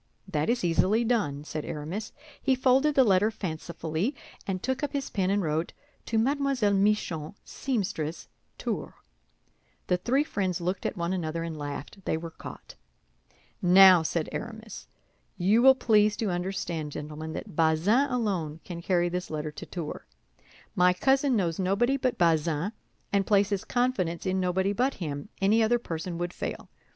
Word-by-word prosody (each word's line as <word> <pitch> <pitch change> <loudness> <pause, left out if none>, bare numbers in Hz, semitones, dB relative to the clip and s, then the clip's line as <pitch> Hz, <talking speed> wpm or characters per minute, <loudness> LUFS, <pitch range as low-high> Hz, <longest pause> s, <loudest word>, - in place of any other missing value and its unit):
"That 155 -3 -1
is 240 -3 +1
easily 185 +6 +3
done," 205 -12 0
said 155 0 -5
Aramis. 165 +8 -5 0.3
He 265 - +3
folded 265 +3 +3
the 265 - +7
letter 205 -1 +4
fancifully, 170 - -3 0.3
and 185 -2 -3
took 260 +2 -1
up 290 - -2
his 280 -2 -3
pen 190 -2 0
and 200 0 +1
wrote: 160 +1 -1 0.3
"To 225 - 0
Mlle. 270 -3 +2
Michon, 195 -5 0
seamstress, 180 - -3 0.3
Tours." - - -4 0.9
The 180 - +1
three 255 +10 +1
friends 190 - -2
looked 180 +2 -2
at - - -5
one 170 +1 -1
another 165 -2 -2
and 165 -1 -4
laughed; 145 +6 -7
they - - 0
were 165 0 -7
caught. - - -10 0.9
"Now," 185 0 +8
said 160 0 -1
Aramis, 220 -2 -7 0.5
"you 200 +6 +3
will 265 +1 +8
please 215 -4 +3
to 215 -4 -1
understand, 175 -4 -3
gentlemen, 155 +1 -6
that - - -7
Bazin 170 - +3
alone 190 - -1
can 170 -2 -7
carry 175 -1 +2
this 180 +1 -3
letter 155 -1 -3
to - - -9
Tours. 170 -4 -5 0.7
My 180 0 +4
cousin 270 +6 +2
knows 175 -5 0
nobody 200 +8 +2
but 255 -2 -1
Bazin, 165 +1 +2 0.4
and 195 -1 +2
places 200 -1 +2
confidence 245 -10 -1
in 190 0 0
nobody 190 +2 +1
but 255 +6 +1
him; 145 -5 -5
any 215 +4 +4
other 230 +2 +3
person 170 -5 -5
would 175 +1 -3
fail. - - -6
185 Hz, 160 wpm, -28 LUFS, 165-225 Hz, 0.9 s, Now